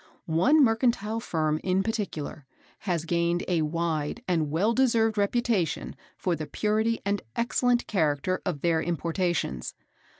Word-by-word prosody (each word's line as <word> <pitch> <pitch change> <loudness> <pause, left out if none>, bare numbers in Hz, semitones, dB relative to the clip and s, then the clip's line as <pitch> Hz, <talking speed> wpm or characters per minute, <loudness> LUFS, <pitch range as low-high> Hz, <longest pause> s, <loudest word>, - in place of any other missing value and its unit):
One 250 - +4
mercantile 225 -2 +1
Firm 155 -7 -1
in 190 +1 +1
particular 190 - -4 0.4
have 170 -2 0
gained 170 +1 +1
a 175 -3 +1
wide 160 +5 -2
and 165 -5 +1
well 190 +10 +2
deserved 230 -4 +3
reputation 210 -3 0 0.2
for 180 -2 0
the 155 -1 -5
purity 220 +2 0
and 200 0 0
excellent 240 +1 +1
character 160 -1 0
of 170 -7 -3
their 165 -2 +2
importations. 170 - -2
180 Hz, 130 wpm, -27 LUFS, 160-225 Hz, 0.4 s, One